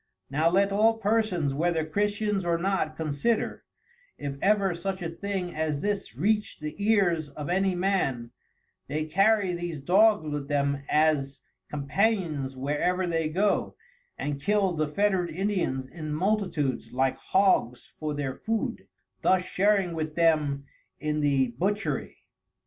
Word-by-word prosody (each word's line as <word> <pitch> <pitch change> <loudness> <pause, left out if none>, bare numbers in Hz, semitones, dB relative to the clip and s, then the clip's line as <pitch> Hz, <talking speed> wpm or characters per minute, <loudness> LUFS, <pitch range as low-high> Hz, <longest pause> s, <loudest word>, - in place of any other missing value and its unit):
Now 155 +4 +3
let 195 +3 +3
all 220 +3 +3
persons 205 -9 +1
whether 160 +2 0
Christians 205 +3 0
or 170 -1 +1
not 175 -3 -1
consider, 160 +9 -1 0.5
if 140 -1 -4
ever 200 -2 +3
such 185 +2 -4
a 165 - -2
thing 190 0 -4
as 155 -2 -1
this 200 - -2
reacht 210 - 0
the 150 -1 -5
ears 180 -8 +2
of 145 +2 -7
any 190 +1 +1
Man, 175 -11 0 0.6
they 155 +1 -2
carry 195 +3 +3
these 175 -3 -4
Dogs 195 +3 +4
with 145 -2 -3
them 140 -1 0
as 145 -3 +2 0.3
Companions 150 -2 0
where 145 +3 -2
ever 180 +1 +1
they 165 -2 0
go, 195 +6 0 0.4
and 145 -1 -3
kill 200 +2 +2
the 155 -2 0
fettered 190 +1 +1
Indians 170 -7 -1
in 155 +2 -7
multitudes 180 -7 -1
like 130 +1 +1
Hogs 160 -10 +1
for 155 -1 -2
their 140 -2 -2
Food; 225 +6 -3 0.3
thus 185 -1 +3
sharing 195 -1 +2
with 155 -1 -4
them 150 -4 +2 0.3
in 150 0 -1
the 135 -3 +2
Butchery. 205 +4 -2
170 Hz, 140 wpm, -27 LUFS, 145-195 Hz, 0.6 s, Dogs